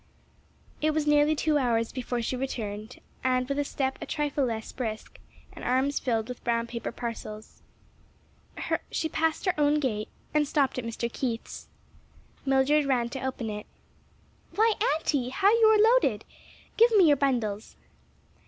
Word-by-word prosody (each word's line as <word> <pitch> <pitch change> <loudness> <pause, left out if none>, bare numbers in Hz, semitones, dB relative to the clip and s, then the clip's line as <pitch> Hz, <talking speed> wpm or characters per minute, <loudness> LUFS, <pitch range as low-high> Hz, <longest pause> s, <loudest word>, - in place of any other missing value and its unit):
It 310 0 +1
was 310 -1 +1
nearly 295 +1 +4
two 300 0 +1
hours 230 -3 +1
before 245 -2 -3
she 255 - -2
returned, 220 -4 -5 0.2
with 255 +2 +1
a - - +2
step 265 -1 -2
a - - -5
trifle 295 -2 0
less 225 -2 -4
brisk, 220 -4 -5 0.3
and - - -10
arms 260 +3 +1
filled 225 -4 -1
with 250 -1 -8
brown 230 -1 0
paper 235 -1 -5
parcels. 225 -2 -7 1.3
She 320 - -1
passed 320 +2 -1
her 370 - +2
own 295 +1 +3
gate 215 -7 -2 0.2
and 300 -1 +2
stopped 275 -3 +1
at 240 - -5
Mr. 230 +1 -3
Keith's. 235 -4 -4 0.8
Mildred 275 +2 +3
ran 245 -3 +1
to 265 +1 -6
open 250 -4 -3
it. 210 0 -7 0.9
"Why, 445 +1 +4 0.2
auntie, 280 -6 -1
how 390 +10 +3
you 455 -1 +5
are 440 +2 +6
loaded! 250 - +2 0.5
Give 465 +2 +7
me 375 - +7
your 290 -3 +5
bundles." 235 -6 -1
265 Hz, 155 wpm, -27 LUFS, 235-295 Hz, 1.3 s, Give